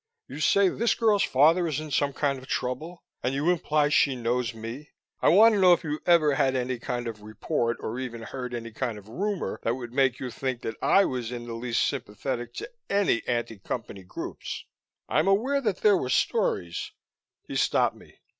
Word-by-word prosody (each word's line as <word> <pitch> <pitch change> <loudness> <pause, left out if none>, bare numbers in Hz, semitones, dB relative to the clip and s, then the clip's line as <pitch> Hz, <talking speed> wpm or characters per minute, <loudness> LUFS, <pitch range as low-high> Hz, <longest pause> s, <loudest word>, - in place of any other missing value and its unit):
You - - -8
say 200 +5 +4
this 230 +5 +1
girl's 215 -3 +3
father 165 +6 +4
is 150 -3 -1
in 155 -1 -7
some 140 0 +1
kind 140 -1 -1
of 130 - -14
trouble, 155 +8 -3 0.2
and 130 +2 -1
you 150 +5 +2
imply 150 -3 +1
she 140 -2 +3
knows 120 -1 -1
me. 115 +6 -8 0.3
I - - +5
want 220 +6 +7
to 205 - +1
know 180 -1 +8
if - - 0
you've 150 -1 -3
ever 160 -4 +5
had 135 -1 +2
any 125 -1 -1
kind 120 0 -3
of 110 -2 -6
report, 110 +2 -2
or 115 +3 -4
even 120 -3 -5
heard 125 0 -5
any 115 -1 -6
kind 115 -1 -3
of 105 0 -13
rumor, 195 - -3
that 115 - 0
would 120 -2 -8
make 130 -2 +2
you 125 -2 -5
think 130 0 -3
that 110 - -3
I 195 - +5
was 125 -3 -3
in 120 -1 -6
the 120 - -6
least 115 0 0
sympathetic 120 -1 -4
to - - -6 0.2
any 200 -12 +2
anti 120 -3 -2
Company 105 -1 -5
groups? 90 - -7 0.4
I'm 155 +4 +1
aware 250 +9 +2
that 210 -7 -1
there 210 -2 +6
were 130 - -3
stories 85 -8 0 0.2
" - - -52
He - - -6
stopped - - +2
me. - - -19
130 Hz, 205 wpm, -27 LUFS, 120-165 Hz, 0.4 s, know